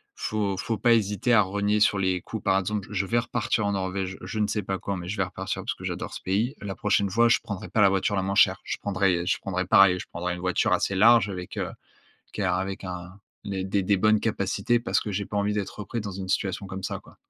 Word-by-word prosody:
faut 100 -3 -2
faut 115 +2 -2
pas 120 -1 +4
hésiter 105 +2 +1
à 105 - +7
renier 100 +2 0
sur 105 -1 +4
les 95 -2 0
coûts. 110 - -6
Par 95 -1 +2
exemple, 100 +1 -3
je 100 -1 0
vais 120 - +1
repartir 115 -2 -1
en 100 - +1
Norvège, 95 -1 -2
je 110 - -6
ne 105 - +3
sais 105 0 -1
pas 95 0 -2
quand 100 +1 -3
mais 90 -1 -6
je 105 +2 -4
vais 95 - +2
repartir 90 - -4
parce - - -2
que - - -13
j'adore - - -4
ce - - -7
pays. 110 +9 0
La 100 -1 -5
prochaine 100 -1 +1
fois, 115 +4 +4
je - - +4
prendrais 105 0 -6
pas 110 - +1
la 100 - +7
voiture 95 +1 0
la 95 - +1
moins 100 +1 -2
chère, 100 - +5
je - - -3
prendrais 95 -3 0
je - - +1
prendrai 90 -1 -2
pareil, 95 -2 +6
je - - -6
prendrai 90 +1 -3
une - - -8
voiture 90 0 +1
assez 100 - +1
large 110 0 +6
avec, 90 -2 -7
heu, - - -2 0.6
qui 105 - -3
a 90 -1 +1
avec 95 +1 -4
un 90 +1 -7 0.3
des 95 -2 -3
des 95 0 0
des 100 +1 +2
bonnes 110 +2 +3
capacités 115 +2 0
parce - - +1
que 105 - -5
j'ai 100 +1 -2
pas 105 - -5
envie 100 +1 +1
d'être 105 0 -4
repris 115 +2 -4
dans 100 -2 -5
une 95 0 -6
situation 95 +1 -1
comme 95 0 -7
ça, - - -3
quoi. - - -19
100 Hz, 265 wpm, -26 LUFS, 95-105 Hz, 0.6 s, à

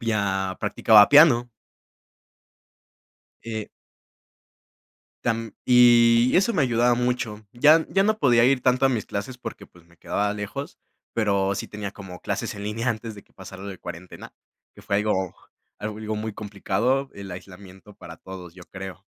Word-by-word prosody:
ya 100 -4 -1
practicaba 105 -2 +5
piano. 145 -5 +6 1.9
Eh 110 -2 -5 1.5
Tam 115 -2 -2
y, 120 -1 +5
eso 195 +5 +3
me 180 - +1
ayudaba 120 -1 +2
mucho. 120 -3 -2
Ya 150 +6 +5
ya 195 - +2
no 215 +1 +1
podía 120 -4 +4
ir 130 0 +2
tanto 125 +1 +2
a - - +4
mis 115 -5 -2
clases 105 +6 -5
porque, 115 -2 -8
pues, 90 - -21
me 85 0 -25
quedaba 100 +4 -2
lejos, 105 +7 -6 0.4
pero 100 -3 0
sí - - -5
tenía 105 -2 -6
como 95 -3 -11
clases - - -4
en 100 - -7
línea 115 +4 -2
antes 115 -1 -5
de 100 - -13
que - - -33
pasara 95 0 -11
lo 100 - -6
de 95 - -8
cuarentena, 85 +2 -10 0.4
que - - -14
fue 100 - -1
algo, 100 -3 -1 0.5
algo 110 0 -5
muy 110 0 -4
complicado, 105 +7 -1
el 100 -2 -9
aislamiento 95 +2 -12
para - - -12
todos, 90 -3 -10
yo 90 0 -13
creo. 95 -1 -9
110 Hz, 155 wpm, -24 LUFS, 100-125 Hz, 1.9 s, piano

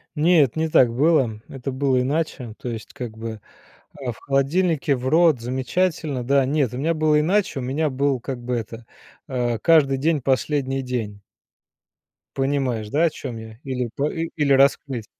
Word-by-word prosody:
Нет, 155 -5 +4
не 160 0 0
так 130 -7 +4
было. 130 -6 +2
Это 135 0 -6
было 130 -1 +1
иначе. 135 -4 -2
То 125 - -5
есть, 110 -3 -7
как 115 -3 -7
бы, 110 -1 -6 0.5
а, 130 -3 -5
в 115 - -12
холодильнике, 145 +2 +1
в 125 0 -4
рот, 160 -2 +4
замечательно, 130 +3 -1
да. 140 +2 +3
Нет, 135 -3 0
у - - -4
меня 160 +5 0
было 155 -1 +3
иначе. 185 -1 +1
У - - -4
меня 140 +5 -1
был, 135 0 0
как 130 +1 -5
бы 125 0 -2
это, 115 0 -6 0.4
э, 120 -4 -1
каждый 150 -5 +4
день- 150 +2 +1
последний 135 +1 0
день. 115 -6 -4 1.1
Понимаешь, 135 -5 -1
да, 150 +8 +1
о 170 - +4
чём 125 -6 -7
я? 110 0 -10
Или 125 -3 -3
па 145 +2 0
и 165 0 -3
или 145 -3 +2
раскрыть? 135 -3 +2
135 Hz, 175 wpm, -22 LUFS, 125-150 Hz, 1.1 s, Нет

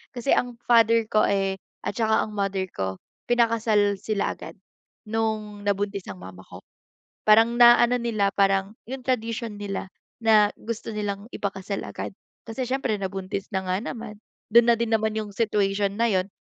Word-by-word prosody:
kasi 245 +3 +1
ang 245 -1 -1
father 230 -1 +5
ko 215 - +3
eh, 195 -1 +1 0.3
at - - -1
tsaka 220 -2 +2
ang 215 - -10
mother 195 -1 -1
ko, 95 -1 -3 0.3
pinakasal 225 -4 +3
sila 215 -2 -1
agad, - - -10 0.5
nung 215 -2 -2
nabuntis 200 -1 -1
ang 95 - -10
mama 95 0 -10
ko. - - -12 0.6
Parang 225 +2 +5
naano 240 0 +7
nila 220 -4 0
parang 195 +1 +2
yung 265 +3 -6
tradition 230 -3 -2
nila 200 -2 -4 0.3
na 215 -2 +5
gusto 225 0 -5
nilang 205 -1 -3
ipakasal 200 0 -4
agad. - - -6 0.3
Kasi 245 +2 -4
siyempre, 260 -4 0
nabuntis 190 0 -4
na 190 -1 -2
nga 185 +1 0
naman, 225 -2 -7 0.3
dun 235 +1 +6
na 235 - +6
din 230 0 -2
naman 220 0 +1
yung 215 -2 -3
situation 200 -2 0
na 230 0 +2
yun. 185 -1 +1
215 Hz, 160 wpm, -25 LUFS, 200-230 Hz, 0.6 s, naano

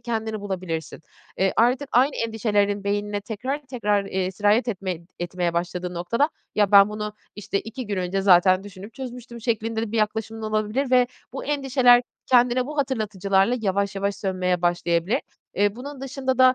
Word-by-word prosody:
kendini 220 -2 -3
bulabilirsin. 180 -7 -4 0.4
Eee, 190 0 +2
artık 250 +4 +2
aynı 265 +4 +3
endişelerinin 205 -3 0
beynine 205 0 -1
tekrar 250 +7 -4
tekrar, 210 -6 0
eee, 190 -1 -2
sirayet 210 +5 +2
etme 185 -5 -3 0.2
etmeye 175 0 -2
başladığı 175 +1 -3
noktada, 230 - +1 0.3
"Ya, 205 -1 +2
ben 200 0 +8
bunu, 210 0 -5 0.2
işte, 200 -1 -2
2 240 +2 -7
gün 205 -2 -2
önce 185 +1 -1
zaten 185 0 +5
düşünüp 205 +2 -11
çözmüştüm." 250 -2 -8
şeklinde 225 -1 -1
de 220 - -4
bir 230 - -1
yaklaşımın 220 +1 -1
olabilir 215 +5 -1
ve 250 -1 +5 0.3
bu 270 - -5
endişeler 260 -4 +4 0.2
kendine 250 0 +3
bu 300 +1 -6
hatırlatıcılarla 215 -4 +1
yavaş 200 0 0
yavaş 200 +1 -1
sönmeye 185 -2 -1
başlayabilir. 175 +3 +1 0.3
Eee, 205 +1 +1
bunun 275 +2 -8
dışında 265 -1 -2
da, 255 0 +7
210 Hz, 160 wpm, -24 LUFS, 195-245 Hz, 0.4 s, ben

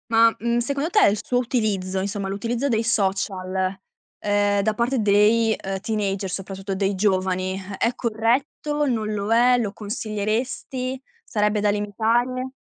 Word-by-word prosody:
Ma, 230 0 +5
mhmm, 235 +1 +1
secondo 280 +6 -1
te 420 - +3
il 205 - +2
suo 245 - 0
utilizzo, 210 -7 0
insomma 200 0 -3
l'utilizzo 230 +7 -2
dei 230 -4 +1
social, 190 -3 -1 0.4
ehm, 205 0 +2
da 215 +2 +1
parte 240 +3 0
dei, 215 +2 +4
ehm, 195 0 -4
teenager, 200 -2 -2
soprattutto 195 +1 -5
dei 195 +1 0
giovani, 185 -1 0 0.2
è 235 +1 +1
corretto, 255 +6 0
non 220 -4 -1
lo 205 +1 -2
è, 245 +2 +5
lo 220 -5 -1
consiglieresti, 225 +5 -3 0.2
sarebbe 210 -2 0
da 210 - +2
limitare? 230 +5 0
215 Hz, 140 wpm, -23 LUFS, 195-235 Hz, 0.4 s, Ma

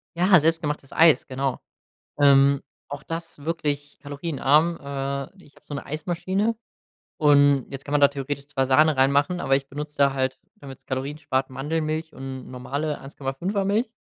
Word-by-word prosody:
Ja, 185 +2 +5
selbstgemachtes 150 -3 -1
Eis, 160 -2 +5
genau. 135 0 -2 0.6
Ähm, 140 -1 +5 0.3
auch 145 0 -7
das 165 -2 -7
wirklich 145 -3 -3
kalorienarm. 145 +2 +1
Äh, 140 +5 -5
ich 145 - -21
habe - - -23
so 145 - -8
'ne 140 - -5
Eismaschine 185 +8 -1 0.6
und 145 -3 +4
jetzt 135 0 -8
kann 145 - -7
man 145 - +3
da 140 - +7
theoretisch 140 0 -5
zwar 135 -2 -1
Sahne 150 +3 +4
reinmachen, 140 +6 +2
aber 135 - +2
ich 135 0 -5
benutze 150 +2 -7
da 140 -1 +4
halt, 130 -1 -1 0.2
damit’s 135 -2 -12
Kalorien 135 +3 -3
spart, 135 -3 -1
Mandelmilch 155 +3 -3
und 130 -1 -8
normale 140 +4 -3
1,5er 145 +9 -3
Milch. 220 +4 +1
145 Hz, 160 wpm, -24 LUFS, 135-160 Hz, 0.6 s, da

